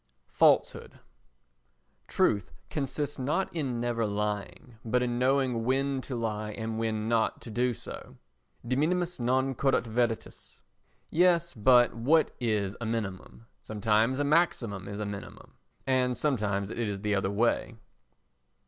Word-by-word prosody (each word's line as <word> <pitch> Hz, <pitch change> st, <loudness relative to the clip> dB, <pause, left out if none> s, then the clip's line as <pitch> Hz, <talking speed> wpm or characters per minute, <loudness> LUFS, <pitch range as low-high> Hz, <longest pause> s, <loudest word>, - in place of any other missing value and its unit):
Falsehood -, -, +3 dB
i -, -, -19 dB, 1.1 s
Truth 100 Hz, -3 st, +1 dB, 0.2 s
consists 145 Hz, 0 st, -3 dB
not 160 Hz, +9 st, -1 dB
in 135 Hz, -7 st, -2 dB
never 120 Hz, -2 st, 0 dB
lying 105 Hz, +4 st, -4 dB
but 125 Hz, +2 st, +1 dB
in 120 Hz, -1 st, -1 dB
knowing 130 Hz, -2 st, +2 dB
when 135 Hz, +2 st, 0 dB
to 130 Hz, -, -6 dB
lie 110 Hz, -2 st, -3 dB
and 110 Hz, 0 st, -4 dB
when 110 Hz, -1 st, -1 dB
not 115 Hz, -1 st, +1 dB
to 115 Hz, -, -9 dB
do 125 Hz, +3 st, +1 dB
so. 115 Hz, -, -9 dB, 0.5 s
De 130 Hz, -, +1 dB
minimis 175 Hz, +4 st, 0 dB
non 130 Hz, +2 st, +1 dB
curat 135 Hz, 0 st, +1 dB
veritas. 115 Hz, 0 st, -3 dB, 0.5 s
Yes, 170 Hz, 0 st, +3 dB
but 120 Hz, +2 st, +5 dB
what 145 Hz, +8 st, +3 dB
is 105 Hz, -4 st, -1 dB
a -, -, -2 dB
minimum? 110 Hz, -1 st, -4 dB, 0.2 s
Sometimes 110 Hz, +3 st, +1 dB
a 145 Hz, -, +1 dB
maximum 135 Hz, -, +1 dB
is 100 Hz, 0 st, -6 dB
a 105 Hz, -, -2 dB
minimum 100 Hz, -1 st, -8 dB, 0.3 s
and 130 Hz, -1 st, +1 dB
sometimes 105 Hz, -8 st, 0 dB
it -, -, -6 dB
is 105 Hz, -4 st, -2 dB
the 105 Hz, 0 st, 0 dB
other 95 Hz, -1 st, +1 dB
way. 115 Hz, +3 st, 0 dB
120 Hz, 140 wpm, -29 LUFS, 105-135 Hz, 1.1 s, but